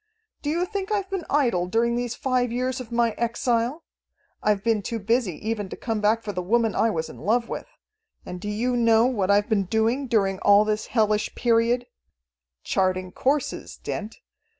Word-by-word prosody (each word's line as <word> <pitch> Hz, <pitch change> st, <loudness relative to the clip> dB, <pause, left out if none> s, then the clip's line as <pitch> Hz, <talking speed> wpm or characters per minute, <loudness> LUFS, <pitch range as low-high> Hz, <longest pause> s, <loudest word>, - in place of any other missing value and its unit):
"Do 290 Hz, -, -2 dB
you 340 Hz, +4 st, +1 dB
think 395 Hz, 0 st, -4 dB
I've 400 Hz, -2 st, -1 dB
been 385 Hz, -4 st, -3 dB
idle 235 Hz, -12 st, +2 dB
during 235 Hz, +4 st, +1 dB
these 240 Hz, -1 st, -2 dB
five 250 Hz, -2 st, 0 dB
years 255 Hz, +2 st, -1 dB
of 240 Hz, -2 st, -10 dB
my 235 Hz, -1 st, +2 dB
exile? 235 Hz, +5 st, 0 dB, 0.6 s
I've 205 Hz, -2 st, +1 dB
been 225 Hz, -2 st, +2 dB
too 230 Hz, +3 st, -3 dB
busy 225 Hz, -2 st, 0 dB
even 210 Hz, -4 st, -2 dB
to -, -, -6 dB
come 225 Hz, -3 st, -2 dB
back 220 Hz, +2 st, +2 dB
for 210 Hz, -, -3 dB
the 180 Hz, -, -2 dB
woman 225 Hz, +3 st, +1 dB
I 225 Hz, -, +2 dB
was 160 Hz, -6 st, -2 dB
in -, -, -11 dB
love 235 Hz, +3 st, +1 dB
with. -, -, -5 dB, 0.6 s
And 180 Hz, 0 st, -7 dB
do 210 Hz, -, -4 dB
you 240 Hz, +4 st, 0 dB
know 230 Hz, -1 st, +4 dB
what 210 Hz, -7 st, 0 dB
I've 205 Hz, +1 st, +4 dB
been 210 Hz, -4 st, +1 dB
doing 225 Hz, +7 st, 0 dB
during 195 Hz, -5 st, +1 dB
all 205 Hz, +1 st, +5 dB
this 215 Hz, 0 st, -1 dB
hellish 215 Hz, -2 st, +1 dB
period? 235 Hz, +1 st, +2 dB, 0.8 s
Charting 185 Hz, -1 st, 0 dB
courses, 275 Hz, +7 st, -1 dB
Dent! 215 Hz, +1 st, -5 dB
230 Hz, 185 wpm, -25 LUFS, 210-245 Hz, 0.8 s, all